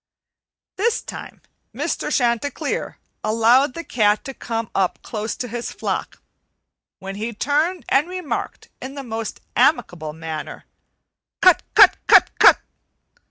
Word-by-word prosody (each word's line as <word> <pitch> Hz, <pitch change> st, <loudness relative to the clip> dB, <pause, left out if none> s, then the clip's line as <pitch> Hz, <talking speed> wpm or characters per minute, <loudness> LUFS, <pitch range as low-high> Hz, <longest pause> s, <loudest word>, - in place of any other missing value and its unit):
This 450 Hz, +4 st, +1 dB
time -, -, -9 dB, 0.3 s
Mr. -, -, -2 dB
Chanticleer 245 Hz, +2 st, -1 dB, 0.3 s
allowed 230 Hz, +5 st, +3 dB
the 335 Hz, -, -5 dB
cat 210 Hz, -7 st, +1 dB
to 270 Hz, -, -6 dB
come 230 Hz, -3 st, -4 dB
up 190 Hz, -2 st, 0 dB
close 215 Hz, 0 st, -4 dB
to 250 Hz, -, -5 dB
his 240 Hz, +1 st, -5 dB
flock, -, -, -4 dB, 0.8 s
when 195 Hz, +1 st, -7 dB
he 225 Hz, +3 st, -4 dB
turned 300 Hz, -, 0 dB
and 280 Hz, +6 st, +2 dB
remarked 365 Hz, -5 st, -5 dB
in 265 Hz, +2 st, -7 dB
the 280 Hz, -, -6 dB
most 225 Hz, -2 st, -5 dB
amicable 155 Hz, -, +1 dB
manner, 160 Hz, -1 st, -7 dB, 0.7 s
"Cut -, -, +5 dB
cut -, -, +8 dB
cut -, -, +6 dB
cut!" -, -, +8 dB
235 Hz, 125 wpm, -21 LUFS, 210-285 Hz, 0.8 s, cut